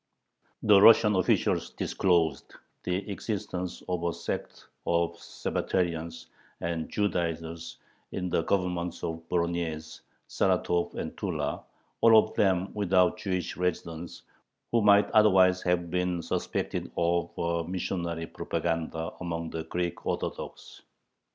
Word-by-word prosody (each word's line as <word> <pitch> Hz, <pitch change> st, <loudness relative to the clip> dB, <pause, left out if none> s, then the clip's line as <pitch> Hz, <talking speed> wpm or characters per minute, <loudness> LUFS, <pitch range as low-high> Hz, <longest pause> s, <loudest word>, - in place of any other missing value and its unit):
The 100 Hz, -2 st, +7 dB
Russian 105 Hz, -1 st, +7 dB
officials 95 Hz, -, +2 dB
disclosed 85 Hz, -4 st, 0 dB, 0.3 s
the 90 Hz, +3 st, -1 dB
existence 95 Hz, -3 st, -4 dB
of 90 Hz, -2 st, -2 dB
a 85 Hz, -, +1 dB
sect 85 Hz, 0 st, -5 dB, 0.2 s
of 85 Hz, 0 st, +1 dB
"Sabbatarians" 85 Hz, -3 st, -2 dB, 0.3 s
and 85 Hz, -1 st, -3 dB
"Judaizers" 85 Hz, -4 st, -2 dB, 0.3 s
in 90 Hz, -1 st, -3 dB
the 85 Hz, -, +1 dB
Governments 90 Hz, -1 st, -1 dB
of 80 Hz, 0 st, -3 dB
Voronyezh, 85 Hz, -2 st, -2 dB, 0.3 s
Saratov, 85 Hz, 0 st, +1 dB
and -, -, -5 dB
Tula, -, -, -2 dB, 0.4 s
all 115 Hz, -1 st, +8 dB
of 110 Hz, -, +3 dB
them 95 Hz, -2 st, +1 dB
without 95 Hz, -1 st, +3 dB
Jewish 90 Hz, -5 st, -2 dB
residents, 85 Hz, -2 st, -3 dB, 0.5 s
who 115 Hz, -, +3 dB
might 100 Hz, 0 st, +5 dB
otherwise 95 Hz, -4 st, +5 dB
have 85 Hz, -1 st, 0 dB
been 90 Hz, -1 st, 0 dB
suspected -, -, -2 dB
of 85 Hz, 0 st, +1 dB
a 85 Hz, 0 st, 0 dB
missionary 85 Hz, -2 st, -2 dB
propaganda 80 Hz, -1 st, -3 dB
among 85 Hz, -2 st, -4 dB
the 80 Hz, -1 st, -4 dB
Greek 85 Hz, +1 st, -3 dB
Orthodox. -, -, -5 dB
85 Hz, 115 wpm, -28 LUFS, 85-95 Hz, 0.5 s, all